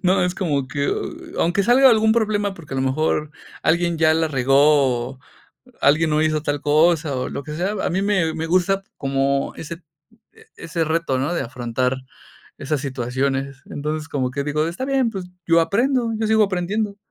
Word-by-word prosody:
No, 185 0 +3
es 180 - -1
como 145 -9 -1
que, 140 0 -1 0.5
aunque 175 +4 +2
salga 255 +5 +6
algún 220 -1 +4
problema, 210 -3 0
porque 150 -6 -9
a - - -2
lo 130 - 0
mejor 150 +2 0 0.3
alguien 170 0 +1
ya 155 0 +4
la 160 0 +1
regó, 135 -2 +3
o - - -26 0.6
alguien 155 +3 +4
no 150 - +2
hizo 155 -1 +1
tal 145 -1 -2
cosa, 155 0 +2
o 125 - -3
lo 140 - -5
que 150 0 -7
sea, 185 +5 -1
a - - 0
mí 185 +3 0
me 190 -6 +1
me 160 - -3
gusta 185 +3 +1
como 135 0 0
ese 170 +2 -8 0.7
ese 165 0 -3
reto, 160 -4 0
¿no? 140 +6 -1
De 175 - -1
afrontar 125 +1 -2 0.6
esas 145 +1 -2
situaciones. 135 +1 -2
Entonces, 150 +1 -4
como 130 -4 -1
que 140 +1 -3
digo, 150 +2 0
está 175 +10 -4
bien, 270 -3 +1
pues, 190 -3 -5 0.2
yo 165 0 +5
aprendo, 235 +6 +1
yo 220 - -1
sigo 220 0 +4
aprendiendo, 200 +2 -2
160 Hz, 180 wpm, -21 LUFS, 140-190 Hz, 0.7 s, salga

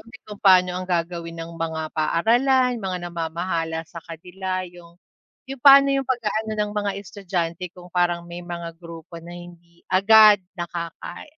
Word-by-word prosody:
din 245 +5 -15
kung 210 -1 -10
paano 185 -2 +5
ang 185 0 -5
gagawin 170 -1 -2
ng 165 +1 -7
mga 160 -1 -3
paaralan, 245 - +2
mga 190 -2 -3
namamahala 165 -1 -3
sa 170 +1 -10
kanila, 185 +3 -5
'yong 175 -1 -16 0.5
'yong 270 -1 -8
pa'no 275 0 +8
'yong 270 -1 -1
pag-aano 220 -3 -1
ng 210 0 -1
mga 205 -1 -1
estudyante 180 -3 -4
kung 180 -1 -15
parang 175 -1 +1
may 175 +1 -8
mga 170 -1 -7
grupo 165 0 -10
na 170 +1 -12
hindi 170 -1 -15
agad 210 +1 +7 0.2
nakaka 175 - -6
175 Hz, 155 wpm, -23 LUFS, 170-210 Hz, 0.5 s, pa'no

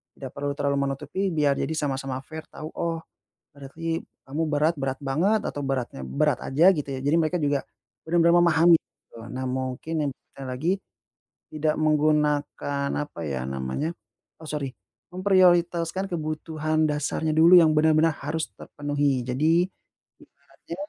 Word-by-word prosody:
Tidak 135 - -7
perlu 140 +1 -3
terlalu 140 0 0
menutupi, 150 +8 -3
biar 145 -3 +2
jadi 160 - -1
sama-sama 135 -3 -2
fair 160 +3 -9
tahu, 155 - -8
oh, 165 -1 -3 0.5
berarti 165 +4 -4 0.3
kamu 145 +4 -2
berat 150 +3 +2
berat 135 -1 -2
banget, 170 +11 +1
atau 145 - -5
beratnya 130 - -3
berat 65 - +1
aja, 160 +7 +5
gitu 145 -1 -4
ya. 130 - -4
Jadi 145 +4 +2
mereka 165 +2 +1
juga 145 -1 0 0.4
bener-bener 170 +1 +4
memahami, 170 0 +6
gitu. 115 - -21 0.2
Nah, 130 +1 -3
mungkin 130 +4 -3
yang - - -2 0.3
te 135 - -7
lagi, 130 +7 -1 0.8
tidak 155 0 -1
menggunakan, 150 -2 +1
apa 145 -12 -6
ya 65 -4 -3
namanya 65 - -3 0.5
oh 160 - -9
sori, 140 -3 -3 0.4
memprioritaskan 180 -1 +3
kebutuhan 155 -1 -1
dasarnya 150 +2 -1
dulu 165 +3 +7
yang 160 -2 +5
bener-bener 155 +1 +4
harus 155 +2 -4
terpenuhi. 145 -3 -1
Jadi 155 +8 +2 0.6
ibaratnya - - -13
150 Hz, 140 wpm, -25 LUFS, 140-165 Hz, 0.8 s, dulu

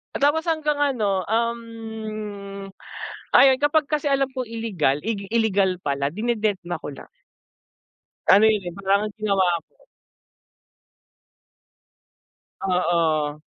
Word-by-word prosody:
oh, - - -2
tapos 310 +3 +3
hanggang 305 -3 0
ano, 215 -10 +1
um, 220 -3 -4 0.7
ayun, 265 -1 +7
kapag 290 +1 +2
kasi 300 -1 -1
alam 275 -1 +2
kong 255 -2 -4
ilegal, 200 -12 -1
igil 205 -3 -3
ilegal 200 -5 +2
pala, 140 0 -1
dinededma 210 -5 -1
ko - - -7
na. - - -12 1.3
Ano 200 +3 +6
'yon, 215 -2 +1
'yon, 175 -1 -6
parang 195 +1 +2
yung 210 - -7
ginawa 200 -3 +2 0.2
ko. - - -37 2.9
Oo, 165 -5 +1
215 Hz, 110 wpm, -23 LUFS, 190-240 Hz, 2.9 s, ayun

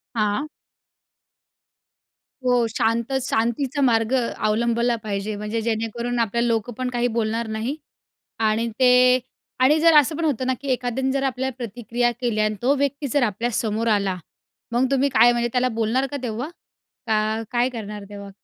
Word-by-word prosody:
हां. 215 +6 0 2.0
हो, 245 -2 +3
शांत 230 +2 0
शांतीचा 255 +4 -1
मार्ग 225 -2 +2
अवलंबला 235 0 0
पाहिजे, 205 0 -3
म्हणजे 210 +2 -3
जेणेकरून 230 +2 -2
आपल्याला 235 +1 +1
लोकं 230 0 -1
पण 255 -1 -2
काही 245 -1 0
बोलणार 225 +1 -1
नाही. 220 +5 -3 0.6
आणि 225 +1 +1
ते 250 0 +6 0.4
आणि 300 +4 +5
जर 330 0 +5
असं 300 +1 +4
पण 335 - -2
होतं 265 -5 0
ना 260 - +1
की 280 - -7
एखाद्याने 250 +1 -1
जर 275 - 0
आपल्याला 265 -1 -2
प्रतिक्रिया 240 +1 -1
केल्या 220 -4 +1
आणि 215 0 0
तो 270 +3 +3
व्यक्ती 280 +1 -1
जर 285 - +2
आपल्यासमोर 225 0 -1
आला, 200 -3 +1 0.6
मग 245 +2 +2
तुम्ही 275 +1 +2
काय 240 -2 +5
म्हणजे 240 0 0
त्याला 255 0 +2
बोलणार 235 +5 +1
का 285 - -3
तेव्हा? 245 +4 -3 0.6
का 220 0 0
काय 245 +1 +2
करणार 210 -4 -7
तेव्हा? 200 -1 -9
235 Hz, 155 wpm, -23 LUFS, 220-255 Hz, 2.0 s, ते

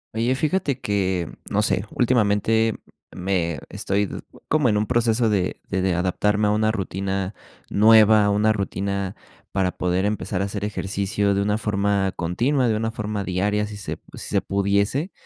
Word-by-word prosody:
Oye, 120 +3 +1
fíjate 155 -1 0
que, 95 -4 -1 0.2
no 105 - +1
sé, 95 -1 0
últimamente 110 -2 +2 0.4
me 90 -3 -1
estoy 100 +1 -1 0.4
como 150 -5 +2
en 105 - +2
un 105 - +1
proceso 120 0 +2
de 95 -4 0
de 95 -2 0
adaptarme 105 +4 +1
a - - +2
una 110 +1 +2
rutina 95 -1 -3 0.4
nueva, 110 0 +6
a - - +2
una 105 +2 +3
rutina 100 -1 -3 0.4
para 95 -2 +1
poder 90 +2 -1
empezar 105 -2 -1
a - - 0
hacer 100 0 -4
ejercicio 100 0 -1
de 100 - +1
una 105 +1 +1
forma 100 -2 0
continua, 120 - +1
de 110 - +2
una 115 +1 -1
forma 105 -2 -3
diaria, 100 +3 0
si 105 0 -8
se 100 - -5 0.2
si - - -8
se - - +4
pudiese, 100 - 0
105 Hz, 160 wpm, -23 LUFS, 95-110 Hz, 0.4 s, nueva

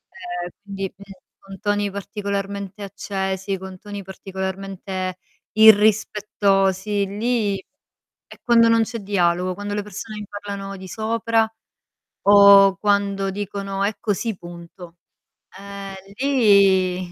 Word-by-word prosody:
ehm, 355 - -5
quindi, 195 -1 -6 0.5
con 195 0 -12
toni 205 0 0
particolarmente 200 0 -5
accesi, 195 -1 -3
con 190 0 -10
toni 205 0 -8
particolarmente 190 -1 -5 0.4
irrispettosi, 205 -2 +3
lì 210 0 0 0.8
è - - -16
quando 230 -1 +5
non 230 0 +4
c'è 225 +1 -5
dialogo, 185 -2 0
quando 205 +1 -5
le 205 - -2
persone 215 +2 -8
mi 205 - -8
parlano 200 -1 -6
di 190 0 -10
sopra 225 +2 0 0.8
o 200 -1 +7
quando 200 -1 +1
dicono: 195 0 -4
"È 205 +1 0
così 220 0 -2
punto." 175 0 -12 0.6
Ehm, 200 0 -8 0.2
lì 195 -8 +3
200 Hz, 110 wpm, -22 LUFS, 190-210 Hz, 0.8 s, o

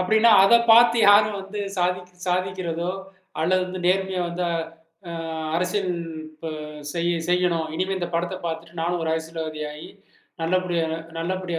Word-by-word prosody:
அப்படின்னா 220 +5 +4
அத 195 +4 +6 0.2
பார்த்து 235 0 +7
யாரும் 205 0 +5
வந்து 195 +2 -6 0.2
சாதிக் 180 0 -2
சாதிக்கிறதோ, 180 -2 -1 0.5
அல்லது 185 +2 0
நேர்மையா 190 0 +1
வந்து 175 +1 -3 0.7
அ - - -5 0.4
அரசியல் 180 +2 0 0.4
இப்ப 155 +1 -8 0.4
செய் 170 0 0 0.2
செய்யணும். 180 -2 +2
"இனிமே 185 +3 -1
இந்த 175 -2 -3
படத்தை 175 +2 -1
பார்த்துட்டு 165 0 -5
நானும் 175 +1 -1
ஒரு 160 - -2
அரசியல்வாதி 160 -1 -4
ஆயி 150 +1 -9 0.5
நல்ல 165 +2 -1
நல்லபடி 185 -1 -1
நல்ல 165 +1 -5
நல்லபடியா 180 0 -2
180 Hz, 140 wpm, -24 LUFS, 165-185 Hz, 0.7 s, பார்த்து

